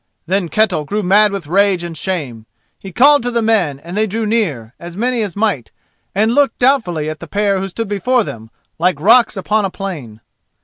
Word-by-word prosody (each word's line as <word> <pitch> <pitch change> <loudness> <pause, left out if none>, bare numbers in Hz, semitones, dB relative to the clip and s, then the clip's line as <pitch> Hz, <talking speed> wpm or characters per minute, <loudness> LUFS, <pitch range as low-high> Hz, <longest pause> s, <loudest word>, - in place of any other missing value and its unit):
Then 185 0 -1
Ketel 195 -7 +1
grew 205 +8 -3
mad 205 +3 +4
with 195 -4 -5
rage 190 +2 +2
and 170 -1 -6
shame. 140 - -4 0.3
He 195 - -9
called 285 +9 +5
to 245 - -2
the 235 -1 -1
men, 215 -11 +1
and 170 +6 -9
they 215 +1 +1
drew 220 +2 -3
near, 160 - -1
as 175 +1 -9
many 245 +1 0
as 205 -5 -4
might, 200 - -1 0.5
and 220 +3 +2
looked 285 +1 +2
doubtfully 220 - +1
at 155 -1 -5
the - - -9
pair 200 -1 0
who 195 - -3
stood 225 +4 -5
before 220 +5 +1
them 110 - -8 0.3
like 180 +2 +1
rocks 230 +1 +4
upon 210 +3 0
a 195 - 0
plain. 155 - -7
195 Hz, 205 wpm, -16 LUFS, 170-220 Hz, 0.5 s, called